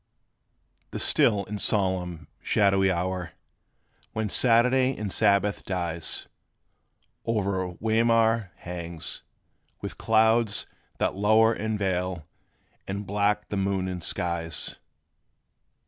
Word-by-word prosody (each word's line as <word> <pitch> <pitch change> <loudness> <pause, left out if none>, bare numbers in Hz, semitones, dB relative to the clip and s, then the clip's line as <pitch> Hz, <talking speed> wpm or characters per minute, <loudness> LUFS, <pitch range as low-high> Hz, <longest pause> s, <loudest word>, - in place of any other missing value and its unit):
The - - -5
still 100 -3 +3
and 105 0 -5
solemn, 90 -6 0
shadowy 95 -2 +3
hour, 90 -1 -2 0.8
When 110 -1 -2
Saturday 125 +4 +3
in 105 -2 -4
Sabbath 100 -1 +2
dies, 85 -3 -3 1.0
O'er 95 -5 -1
Weimar 115 -2 +2
hangs; 85 -2 -5 0.6
with - - -7
clouds 110 -1 +3 0.3
that - - 0
lower 110 +3 +4
And 110 -1 -2
veil 90 -4 -2 0.6
in 100 +2 -3
black 105 +1 0
the 100 - -2
moon 95 -1 0
and 90 -2 -5
skies. 85 -3 -2
100 Hz, 100 wpm, -26 LUFS, 90-110 Hz, 1.0 s, lower